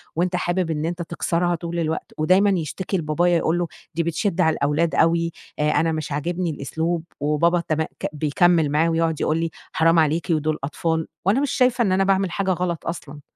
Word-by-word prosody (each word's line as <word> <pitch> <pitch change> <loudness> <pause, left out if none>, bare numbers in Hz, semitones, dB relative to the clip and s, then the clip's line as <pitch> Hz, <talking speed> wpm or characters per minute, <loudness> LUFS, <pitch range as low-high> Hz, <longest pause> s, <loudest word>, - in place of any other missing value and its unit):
وأنت 180 +2 0
حابب 175 -1 0
إن 150 0 -2
أنت 175 +1 -3
تكسرها 170 +1 -1
طول 170 +1 -4
الوقت 160 -1 -2
ودايمًا 185 +6 +4
يشتكي 190 +1 -2
لبابايا 170 +2 +2
يقول 165 +1 +1
له 175 - -1 0.3
دي 170 - +1
بتشد 170 +2 -1
على 160 -2 +3
الأولاد 150 +4 0
أوي 170 0 +2 0.3
آآ، 150 0 +2
أنا 165 0 +2
مش 155 -2 -4
عاجبني 170 +5 -2
الأسلوب 160 +3 -2 0.2
وبابا 150 +4 +2
تمأ 160 0 +1 0.2
ك - - -4
بيكمّل 155 +2 +2
معاه 160 +3 +2
ويقعُد 165 -1 0
يقول 155 - +1
لي 165 0 -1 0.2
حرام 165 +1 +4
عليكِ 160 +2 +1
ودُول 155 -1 +1
أطفال 160 +3 -1 0.2
وأنا 205 +7 +3
مش 285 - 0
شايفة 250 -1 +2
إن 200 - +2
أنا 190 +1 +3
باعمل 195 -2 +1
حاجة 195 0 0
غلط 175 -2 -2
أصلًا. 150 -3 -6
165 Hz, 195 wpm, -22 LUFS, 155-175 Hz, 0.3 s, ودايمًا